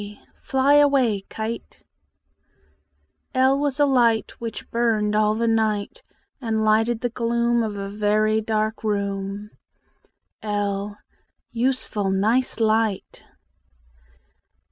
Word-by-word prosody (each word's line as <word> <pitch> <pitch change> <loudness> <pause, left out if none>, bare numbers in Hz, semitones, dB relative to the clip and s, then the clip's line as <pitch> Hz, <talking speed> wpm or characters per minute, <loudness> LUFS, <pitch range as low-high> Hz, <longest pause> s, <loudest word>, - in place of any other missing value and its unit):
k 205 0 -9 0.2
Fly 270 +1 +2
away, 260 -9 +3
kite! 220 +1 -6 1.5
L 265 +1 +3
was 285 -1 -1
a 290 - +5
light 240 -5 +2
Which 230 -1 -6
burned 220 -3 +1
all 215 0 +2
the 230 +1 0
night, 220 - 0 0.4
And 225 -3 -1
lighted 220 +2 +2
the 245 - -1
gloom 235 0 0
Of 215 -2 -3
a 195 0 -4
very 215 +1 +1
dark 220 0 -2
room. 200 0 -3 0.9
l 205 -1 -2 0.5
Useful 235 -5 -1
nice 220 +7 +1
light! 220 -2 0
220 Hz, 105 wpm, -23 LUFS, 210-235 Hz, 1.5 s, a